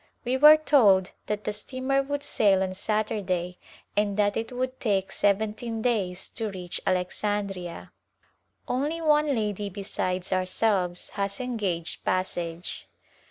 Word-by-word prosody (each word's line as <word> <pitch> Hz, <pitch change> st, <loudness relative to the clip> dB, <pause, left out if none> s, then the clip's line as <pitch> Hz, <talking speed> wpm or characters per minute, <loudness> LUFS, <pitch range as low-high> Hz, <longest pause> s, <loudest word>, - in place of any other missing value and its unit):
We 250 Hz, +2 st, +1 dB
were 300 Hz, +3 st, +9 dB
told 210 Hz, -12 st, +4 dB, 0.2 s
that 210 Hz, 0 st, -2 dB
the 210 Hz, -, -2 dB
steamer 260 Hz, +5 st, -1 dB
would 285 Hz, +1 st, -3 dB
sail 195 Hz, -8 st, +3 dB
on 185 Hz, -1 st, -3 dB
Saturday 190 Hz, -3 st, -2 dB, 0.4 s
and 205 Hz, -1 st, +1 dB
that 205 Hz, -1 st, +2 dB
it 225 Hz, +2 st, -3 dB
would 255 Hz, +1 st, -3 dB
take 195 Hz, -4 st, 0 dB
seventeen 220 Hz, +3 st, 0 dB
days 190 Hz, -7 st, 0 dB
to 225 Hz, -2 st, -4 dB
reach 180 Hz, -3 st, -5 dB
Alexandria. 185 Hz, -1 st, -2 dB, 0.8 s
Only 290 Hz, +6 st, -1 dB
one 300 Hz, -3 st, +3 dB
lady 210 Hz, -2 st, -2 dB
besides 185 Hz, -2 st, -3 dB
ourselves 185 Hz, -1 st, 0 dB
has 200 Hz, +3 st, -3 dB
engaged 205 Hz, -10 st, -3 dB
passage. 175 Hz, -2 st, -2 dB
205 Hz, 125 wpm, -27 LUFS, 185-245 Hz, 0.8 s, were